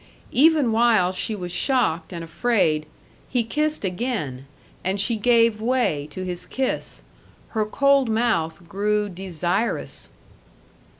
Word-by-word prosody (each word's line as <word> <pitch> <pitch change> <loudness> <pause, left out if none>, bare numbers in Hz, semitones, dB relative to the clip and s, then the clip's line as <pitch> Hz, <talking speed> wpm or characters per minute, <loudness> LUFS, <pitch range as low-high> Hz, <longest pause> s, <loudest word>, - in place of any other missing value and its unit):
Even 295 -3 +4
while 220 -5 +3
she 200 +4 -2
was 180 -3 -6
shocked 180 - +1
and 170 -2 -6
afraid, 165 -4 +1 0.4
he 245 -2 +1
kissed 300 +2 -1
again, 180 - -3 0.4
and 190 +2 -1
she 225 +4 +2
gave 230 -1 +3
way 225 - 0
to 185 +5 -6
his 180 -1 -5
kiss; 265 -1 -3 0.5
her 215 -2 -1
cold 275 +1 +3
mouth 175 -8 0
grew 210 +3 0
desirous. 185 +3 -2
210 Hz, 120 wpm, -23 LUFS, 175-240 Hz, 0.5 s, Even